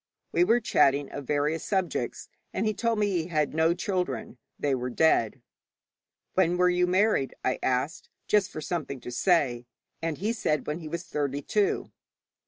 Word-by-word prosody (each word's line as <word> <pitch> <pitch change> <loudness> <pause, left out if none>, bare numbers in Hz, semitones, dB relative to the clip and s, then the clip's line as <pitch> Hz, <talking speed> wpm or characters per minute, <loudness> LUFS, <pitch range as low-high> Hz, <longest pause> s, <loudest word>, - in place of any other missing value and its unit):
We - - +4
were 240 -9 +4
chatting 140 - +2
of 145 -3 -7
various 150 +2 0
subjects, 190 -3 -2 0.3
and - - 0
he 215 - +1
told 230 +1 0
me 210 - +2
he 170 -4 -1
had 155 -4 0
no 160 +2 +3
children; 175 - -3 0.2
they 145 -2 0
were 125 -1 -2
dead. 120 -5 +2 0.9
'When 180 -1 +2
were 180 0 +4
you 180 0 +2
married?' 185 -6 +2
I 130 - +1
asked, 130 +5 -1 0.2
just 210 -2 +3
for 155 - -6
something 150 -4 -3
to 125 - -8
say, 125 -6 +1 0.3
and 165 -2 -2
he 215 +5 -1
said 155 -9 0
when 150 +3 -3
he 160 - -8
was 170 +3 -4
thirty 145 -3 -2
two. 210 +5 0
160 Hz, 175 wpm, -27 LUFS, 140-185 Hz, 0.9 s, We